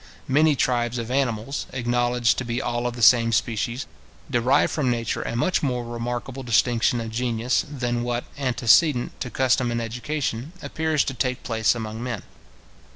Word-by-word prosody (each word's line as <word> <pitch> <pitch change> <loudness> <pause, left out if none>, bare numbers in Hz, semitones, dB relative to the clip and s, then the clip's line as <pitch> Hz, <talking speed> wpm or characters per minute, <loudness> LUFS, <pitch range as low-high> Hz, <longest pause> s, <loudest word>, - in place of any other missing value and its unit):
Many 150 +3 +4
tribes 120 -2 0
of 115 0 -4
animals, 130 -1 -1
acknowledged 120 -1 +1
to - - -2
be 120 0 -2
all 120 -1 -1
of 120 - -4
the 120 - -3
same 115 +1 +6
species, 115 +3 -1 0.5
derive 130 +3 +3
from 145 -5 0
nature 115 -2 -1
a - - -4
much 150 +10 +1
more 125 -4 -1
remarkable 120 +3 -4
distinction 120 0 +2
of 115 -1 -5
genius, 120 +1 0
than 120 -4 -2
what, 120 0 -2
antecedent 125 +1 +2
to 125 - -3
custom 130 +1 +1
and 120 0 -1
education, 125 +4 -3
appears 160 -2 0
to 135 - -3
take 125 +1 -2
place 115 -1 +1
among 110 -1 -5
men. 120 -6 -4
120 Hz, 160 wpm, -24 LUFS, 115-130 Hz, 0.5 s, same